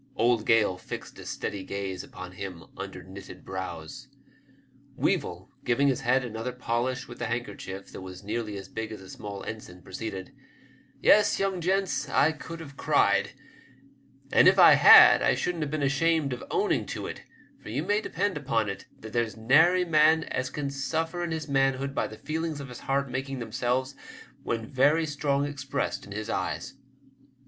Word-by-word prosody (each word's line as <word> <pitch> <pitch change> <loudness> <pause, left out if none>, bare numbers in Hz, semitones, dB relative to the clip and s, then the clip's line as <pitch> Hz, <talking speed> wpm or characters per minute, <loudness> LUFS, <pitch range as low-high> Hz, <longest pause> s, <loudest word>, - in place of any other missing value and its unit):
Old 115 -1 +2
Gale 105 -5 +3
fixed - - -8
a - - -9
steady 100 -2 -4
gaze 95 -1 -4
upon 90 -1 -9
him 90 -2 -7
under 95 -2 -7
knitted 95 0 -11
brows. 95 -4 -6 0.9
Weevil, - - -1
giving 140 +4 +2
his 135 0 -1
head 130 0 +2
another 115 +2 -4
polish 125 +1 -2
with - - -11
the 120 - -2
handkerchief 105 -4 -5
that - - -8
was 95 +1 -9
nearly 105 0 -3
as 95 - -8
big 110 0 -5
as 110 - -7
a 95 -1 -13
small 100 -2 -7
ensign, 90 -5 -8
proceeded 95 -1 -6 0.2
— - - -28
'* - - -32
Yes, 210 - +5
young 195 -2 -1
gents, 185 -5 0
I 150 +2 +4
could 165 +1 -8
have 140 -4 -10
cried, - - +2 1.0
and - - +6
if - - +6
I - - +9
had - - +9
I - - +3
shouldn't 175 -2 -2
have 150 - -3
been 155 -1 -2
ashamed 140 0 +2
of 125 - -7
owning - - 0
to - - -5
it; - - -6 0.4
for - - -10
you 130 +8 -2
may 205 +4 +1
depend 200 -4 -1
upon 115 -7 0
it 100 0 -7
that 110 0 -9
there's 115 -2 -1
nary 160 +11 +4
man 160 0 +4
as 130 -4 -3
can 140 -2 -4
suffer 160 +5 -2
in 170 - -2
his 160 -1 -3
manhood 135 0 +1
by - - 0
the 110 - -11
feelings 160 +1 -3
of 140 -2 -7
his 125 - -9
heart 140 +1 0
making 135 +1 -4
themselves 125 +3 -1 0.5
when 115 -1 -3
very 145 +7 +3
strong 145 -1 0
expressed 140 -4 -3
in - - -12
his 110 +1 -4
eyes." - - -3
130 Hz, 180 wpm, -27 LUFS, 105-150 Hz, 1.0 s, I